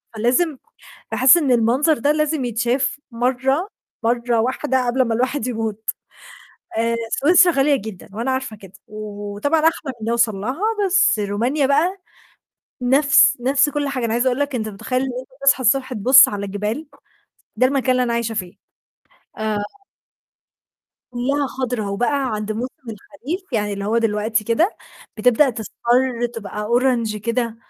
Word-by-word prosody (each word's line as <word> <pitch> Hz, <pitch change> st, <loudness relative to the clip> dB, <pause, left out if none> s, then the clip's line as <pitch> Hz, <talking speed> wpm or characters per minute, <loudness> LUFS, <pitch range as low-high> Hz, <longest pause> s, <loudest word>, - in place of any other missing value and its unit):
فلازم 255 Hz, +8 st, +1 dB, 0.5 s
باحس 260 Hz, +5 st, +6 dB
إن 290 Hz, -6 st, +1 dB
المنظر 250 Hz, +7 st, +2 dB
ده 285 Hz, +5 st, +1 dB
لازم 305 Hz, -2 st, 0 dB
يتشاف 240 Hz, +4 st, -1 dB
مَرّة 260 Hz, -, 0 dB, 0.3 s
مَرّة 235 Hz, 0 st, +1 dB
واحدة 260 Hz, +1 st, -1 dB
قبل 250 Hz, +2 st, +1 dB
ما 230 Hz, -2 st, -2 dB
الواحد 255 Hz, +2 st, -1 dB
يموت 220 Hz, -3 st, -4 dB, 0.9 s
آآ، 230 Hz, +1 st, +1 dB, 0.2 s
سويسرا 350 Hz, +4 st, +5 dB
غالية 280 Hz, 0 st, +3 dB
جدًا، 215 Hz, -6 st, -9 dB
وأنا 230 Hz, +5 st, -3 dB
عارفة 260 Hz, -4 st, -3 dB
كده، 195 Hz, -3 st, -15 dB, 0.2 s
وطبعًا 210 Hz, +7 st, -3 dB
أحلم 310 Hz, -3 st, 0 dB
إن 220 Hz, -, -3 dB
أوصل 235 Hz, -3 st, +1 dB
لها، 255 Hz, -, -4 dB, 0.2 s
بس 390 Hz, -, +3 dB
رومانيا 230 Hz, +8 st, 0 dB
بقى، 320 Hz, +8 st, +1 dB, 0.8 s
نَفْس 280 Hz, +3 st, +4 dB
نَفْس 265 Hz, +3 st, +3 dB
كُلّ 290 Hz, 0 st, -2 dB
حاجة، 260 Hz, -3 st, -3 dB
أنا 225 Hz, -, -1 dB
عايزة 240 Hz, +3 st, 0 dB
أقول 255 Hz, 0 st, +1 dB
لك 285 Hz, -1 st, -1 dB
أنت 220 Hz, -3 st, -2 dB
متخيل 235 Hz, +5 st, -3 dB
إن 270 Hz, -, -2 dB
أنت 255 Hz, -, -15 dB, 0.2 s
تصحى 275 Hz, -1 st, +5 dB
الصبح 260 Hz, +2 st, +2 dB
تبُص 255 Hz, +4 st, +6 dB
على 200 Hz, -1 st, -4 dB
جبال، 210 Hz, +9 st, -4 dB, 0.7 s
ده 255 Hz, +4 st, +4 dB
المكان 265 Hz, -1 st, 0 dB
اللي 255 Hz, 0 st, +1 dB
أنا 240 Hz, -1 st, -1 dB
عايشة 235 Hz, -1 st, -2 dB
فيه. 185 Hz, -4 st, -4 dB, 0.8 s
آآ 215 Hz, -1 st, -1 dB, 1.6 s
كُلّها 275 Hz, +4 st, -1 dB
خضرا 250 Hz, -5 st, -3 dB
وبقى 255 Hz, +6 st, -1 dB
عند 210 Hz, 0 st, -4 dB
موسم 240 Hz, +4 st, -4 dB, 0.2 s
الخريف، 290 Hz, -, -7 dB
يعني 210 Hz, -2 st, -1 dB
اللي 200 Hz, 0 st, -5 dB
هو 220 Hz, +3 st, +1 dB
دلوقتي 220 Hz, -1 st, 0 dB
كده، 235 Hz, -, +1 dB, 0.4 s
بتبدأ 250 Hz, +5 st, +4 dB
تصفَر 240 Hz, +2 st, -1 dB
تبقى 210 Hz, -1 st, -6 dB
Orange 240 Hz, -2 st, +1 dB
كده، 230 Hz, +1 st, -2 dB
245 Hz, 150 wpm, -20 LUFS, 220-275 Hz, 1.6 s, باحس